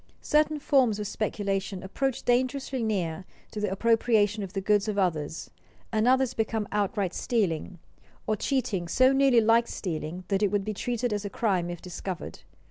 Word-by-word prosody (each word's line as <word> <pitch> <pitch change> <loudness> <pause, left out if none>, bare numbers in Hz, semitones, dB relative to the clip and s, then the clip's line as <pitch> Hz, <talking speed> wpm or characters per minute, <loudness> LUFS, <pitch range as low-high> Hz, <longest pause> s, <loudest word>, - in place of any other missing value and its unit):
Certain 305 0 +2
forms 260 -7 +3
of 210 - -4
speculation 195 -2 -2
approach 265 +7 -2
dangerously 255 +1 0
near 190 -6 -1 0.3
to 215 - -5
the 210 -2 -1
appropriation 220 0 +2
of 195 -2 -6
the 195 - -1
goods 205 +2 +2
of 210 -1 -2
others, 160 -5 -1 0.4
and 220 +1 +1
others 260 0 +3
become 220 -1 -1
outright 200 -2 0
stealing, 185 -6 -1 0.5
or 215 - +1
cheating 230 -7 -1
so 255 +9 +4
nearly 270 -3 +5
like 230 +2 +4
stealing 165 0 -4
that 195 0 +1
it 205 - +3
would 205 -1 -1
be 215 - -2
treated 240 +2 -2
as 205 -1 -2
a 205 - -4
crime 190 -5 0
if 175 -1 -7
discovered. 180 0 -6
210 Hz, 170 wpm, -27 LUFS, 190-240 Hz, 0.5 s, nearly